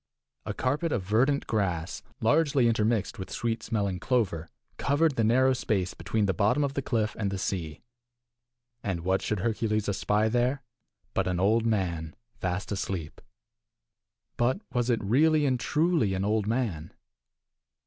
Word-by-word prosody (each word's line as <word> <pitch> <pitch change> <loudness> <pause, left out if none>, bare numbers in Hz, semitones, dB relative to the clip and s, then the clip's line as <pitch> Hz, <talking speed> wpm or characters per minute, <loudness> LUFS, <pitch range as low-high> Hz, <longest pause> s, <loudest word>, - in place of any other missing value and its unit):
A - - -2
carpet 150 +6 0
of 110 - 0
verdant 125 +9 +2
grass, 90 -6 -1 0.2
largely 140 0 +3
intermixed 110 -2 +1
with 95 - -6
sweet 115 -1 -2
smelling 100 -4 -1
clover, 95 -9 0 0.3
covered 145 +1 +2
the 115 - +1
narrow 130 +4 +4
space 100 -7 -1
between 100 +5 -1
the 95 - +1
bottom 115 +8 +2
of 140 -1 -1
the 140 - -1
cliff 115 -5 -1
and 100 -2 0
the 95 - -3
sea. 85 -5 -3 1.0
And 95 -4 -2
what 95 +2 +1
should 105 -3 -2
Hercules 110 -1 0
espy 105 +2 +1
there 125 +4 +1 0.5
but 95 -1 0
an 90 -1 0
old 110 +4 +3
man 85 -7 -1 0.2
fast 90 +3 -2
asleep. 95 -5 -4 1.2
But 125 +9 +2
was 120 0 0
it 115 -3 +1
really 150 +8 +3
and 130 -3 +1
truly 150 - +1
an 95 +1 -1
old 105 0 +1
man? 110 -10 -2
110 Hz, 150 wpm, -28 LUFS, 95-125 Hz, 1.2 s, narrow